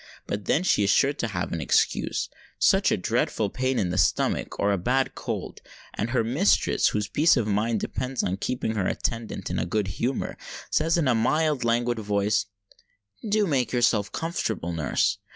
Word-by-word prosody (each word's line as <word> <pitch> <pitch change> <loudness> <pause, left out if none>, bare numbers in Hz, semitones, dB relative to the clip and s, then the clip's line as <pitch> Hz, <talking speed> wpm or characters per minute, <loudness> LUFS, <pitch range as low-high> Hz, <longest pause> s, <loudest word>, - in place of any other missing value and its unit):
But 100 -1 -4
then 160 - +2
she 140 - +3
is 100 - +1
sure 140 +7 +4
to 120 - -3
have 90 -5 -3
an 85 - -2
excuse—such - - +1
a - - +2
dreadful 105 -3 -1
pain 130 0 -1
in 90 -3 0
the 90 - 0
stomach, - - +1
or 100 - +2
a 100 - +1
bad 130 +8 0
cold; - - -5 0.3
and 110 - -2
her 120 -2 +1
mistress, 140 - +2
whose 105 -1 -1
peace 150 - +3
of 120 - +1
mind 105 +1 0
depends 130 0 -3
on 95 +1 -1
keeping 120 +1 -2
her 100 -4 -1
attendant 115 -2 -3
in - - -1
a - - -1
good 105 +2 -1
humour, 120 +8 -2 0.3
says 165 +2 +2
in 160 -5 +1
a 125 - +4
mild, 150 +5 +1
languid 120 0 +1
voice, 105 -1 0 0.8
"Do 210 0 +3
make 130 - 0
yourself 115 -4 +2
comfortable, 115 - -3
nurse!" 80 -5 0
115 Hz, 180 wpm, -25 LUFS, 100-130 Hz, 0.8 s, sure